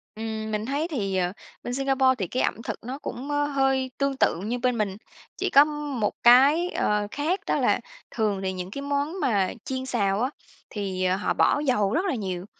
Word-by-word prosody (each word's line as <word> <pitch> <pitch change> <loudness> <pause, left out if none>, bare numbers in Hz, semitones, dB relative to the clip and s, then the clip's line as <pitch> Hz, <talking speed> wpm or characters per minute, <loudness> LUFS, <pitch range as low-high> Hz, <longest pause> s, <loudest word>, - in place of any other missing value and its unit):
Ừm, 220 0 -4
mình 210 0 -2
thấy 285 +6 -1
thì 200 - -2
ờ, 180 0 0 0.3
bên 245 - -4
Singapore 265 -1 +2
thì 190 -5 -2
cái 255 - -1
ẩm - - -1
thực - - -5
nó 255 +4 -5
cũng, 270 +1 -6
ơ, 290 0 +1
hơi 270 -2 +1
tương 275 -1 0
tự 170 - +2
như 240 +2 -2
bên 250 -1 +1
mình, 200 -2 -1 0.4
chỉ - - -1
có 280 +1 +7 0.3
một 210 - 0
cái, 280 +9 +6
ờ, 210 0 0
khác 320 +7 -1
đó - - +2
là - - +2 0.3
thường 210 -4 0
thì 190 0 -1
những 185 0 -6
cái 280 - -5
món 285 +5 -2
mà 200 - +1
chiên 260 0 -3
xào 200 -4 0
á 255 - +1 0.4
thì 190 -3 -3
họ 185 +2 +1
bỏ - - +3
dầu 220 -8 +1
rất 360 - +1
là 365 - 0
nhiều, 185 -4 -4
245 Hz, 210 wpm, -25 LUFS, 205-275 Hz, 0.4 s, có